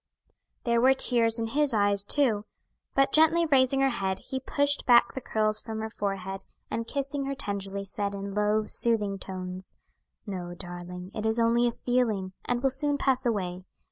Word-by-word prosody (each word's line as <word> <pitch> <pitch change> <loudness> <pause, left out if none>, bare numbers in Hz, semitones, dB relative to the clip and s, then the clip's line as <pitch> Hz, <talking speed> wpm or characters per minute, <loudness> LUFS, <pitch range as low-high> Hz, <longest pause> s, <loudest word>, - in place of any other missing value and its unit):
There 235 -1 +2
were 265 +2 +5
tears 230 -3 +2
in 230 - -1
his 285 -1 +3
eyes, 205 -1 +2
too; 225 -7 +1 0.5
but 275 0 +3
gently 320 +2 +5
raising 270 -2 +3
her 270 0 +3
head, 190 -4 -2
he 265 - -1
pushed 285 +2 0
back 240 -1 +5
the 265 - -5
curls 215 -2 0
from 220 -1 -6
her 220 0 -4
forehead, 195 -2 -4 0.3
and 230 0 -3
kissing 275 0 -3
her 275 0 -3
tenderly, 200 -3 -4
said, 200 +1 -3
in 200 0 -5
low, 210 +1 +1
soothing 210 -4 +2
tones, 185 0 -7 0.5
"No, 180 -4 -6
darling; 180 +1 -8
it 215 - -4
is 220 +1 0
only 235 +1 +3
a - - +1
feeling, 225 -7 -1
and 245 +1 -1
will 270 - +3
soon 285 +2 +1
pass 265 -2 +1
away. 185 -5 -2
220 Hz, 175 wpm, -27 LUFS, 195-260 Hz, 0.5 s, were